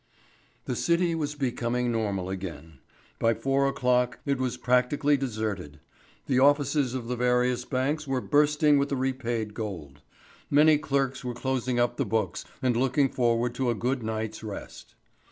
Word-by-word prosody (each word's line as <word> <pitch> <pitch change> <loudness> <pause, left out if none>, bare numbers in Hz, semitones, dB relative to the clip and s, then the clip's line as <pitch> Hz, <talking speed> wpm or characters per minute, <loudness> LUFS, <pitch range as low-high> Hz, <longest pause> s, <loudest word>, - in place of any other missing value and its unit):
The - - -2
City 170 0 +1
was 150 -2 -2
becoming 125 -3 -1
normal 100 -5 -1
again. 80 -6 -7 0.4
By 115 0 +2
four 135 +1 +1
o'clock 125 -2 +1
it 140 -2 0
was 125 -1 -1
practically 125 +4 +2
deserted. 105 - -4 0.5
The 130 -2 +2
offices 140 -1 +3
of 120 -3 -4
the 125 - -2
various 125 0 +1
banks 140 +4 -1
were 135 -1 0
bursting 150 +1 +3
with 140 0 0
the 140 - 0
repaid 120 -5 -2
gold. 85 - -6 0.5
Many 150 +1 +5
clerks 135 -3 -1
were 125 -1 -4
closing 130 -1 -1
up 120 0 +1
the 140 - 0
books 110 +1 -1 0.2
and 125 -2 +2
looking 135 +3 +2
forward 120 -1 +1
to 130 -1 -1
a 120 - +1
good 125 +3 -1
night's 110 0 -4
rest. 105 -2 -9
125 Hz, 155 wpm, -27 LUFS, 115-140 Hz, 0.5 s, Many